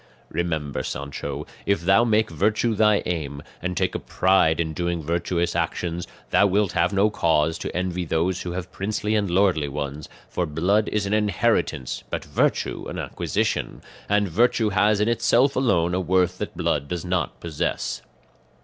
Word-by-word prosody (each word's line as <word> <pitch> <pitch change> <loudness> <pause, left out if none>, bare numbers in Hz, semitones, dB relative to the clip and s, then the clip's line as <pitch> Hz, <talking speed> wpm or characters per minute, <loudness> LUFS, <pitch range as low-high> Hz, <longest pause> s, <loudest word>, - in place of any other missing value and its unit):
"Remember, 80 -6 -2
Sancho, 70 +1 -5 0.2
if 100 -4 +2
thou 95 +6 +4
make 110 -3 +2
virtue 105 +7 +1
thy 105 -1 +3
aim, 75 -5 -3 0.2
and 90 +1 -3
take - - +1
a - - -2
pride 95 -4 +2
in 80 -2 -1
doing 85 0 -2
virtuous 85 +2 -1
actions, 85 +1 -2 0.2
thou 100 - +5
wilt 100 0 +1
have 85 +1 +1
no 100 +2 +3
cause 80 -3 +1
to - - -5
envy 90 -1 -1
those 85 +3 0
who 90 - -4
have 90 0 -5
princely 105 +2 -2
and 105 -3 +1
lordly 90 -5 +2
ones, 70 +1 -5 0.2
for 90 - -2
blood 90 +8 +1
is 105 -2 -1
an 100 - -1
inheritance, 105 -10 0
but - - -4
virtue - - 0
an - - -6
acquisition, - - -2 0.3
and 105 0 +3
virtue 110 +4 +2
has 105 +1 +3
in 105 - +2
itself 120 +3 +3
alone 90 -10 +2
a 90 - +1
worth 90 0 +1
that - - -5
blood 70 -1 0
does 90 +1 -4
not 90 0 -1
possess. 80 -3 -2
90 Hz, 165 wpm, -24 LUFS, 85-105 Hz, 0.3 s, thou